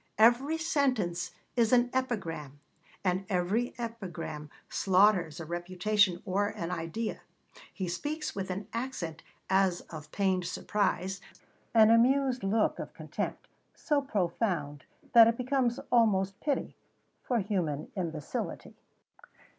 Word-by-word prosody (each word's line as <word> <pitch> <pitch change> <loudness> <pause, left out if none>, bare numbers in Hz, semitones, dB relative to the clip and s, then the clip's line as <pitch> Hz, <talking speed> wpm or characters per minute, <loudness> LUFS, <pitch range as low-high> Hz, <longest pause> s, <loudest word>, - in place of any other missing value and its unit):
Every 245 +8 +5
sentence 255 - 0 0.3
is 230 -3 +3
an 245 0 +4
epigram, 165 - -3 0.4
and 185 0 +1
every 195 +6 0
epigram 175 -10 -6 0.2
slaughters 185 -5 +3
a 165 - -5
reputation 180 +3 +1
or 200 +1 +1
an 170 -4 -4
idea. 180 +6 -3 0.5
He 190 -3 -4
speaks 300 - -3
with 195 -1 -3
an 190 +2 -4
accent 230 -10 -4 0.3
as 190 -2 +2
of 155 -2 -9
pained 190 -3 +1
surprise, 190 -2 -1 0.5
an 220 0 +7
amused 255 +2 +3
look 210 +3 +1
of - - -7
contempt, - - -4 0.3
so 295 -2 +1
profound 175 - -1 0.3
that 230 -1 +10
it 230 0 +1
becomes 250 -1 0
almost 195 -5 +3
pity, 285 -2 -2 0.5
for 245 - 0
human 175 -8 -2
imbecility. 165 -6 -4
200 Hz, 115 wpm, -30 LUFS, 175-235 Hz, 0.5 s, that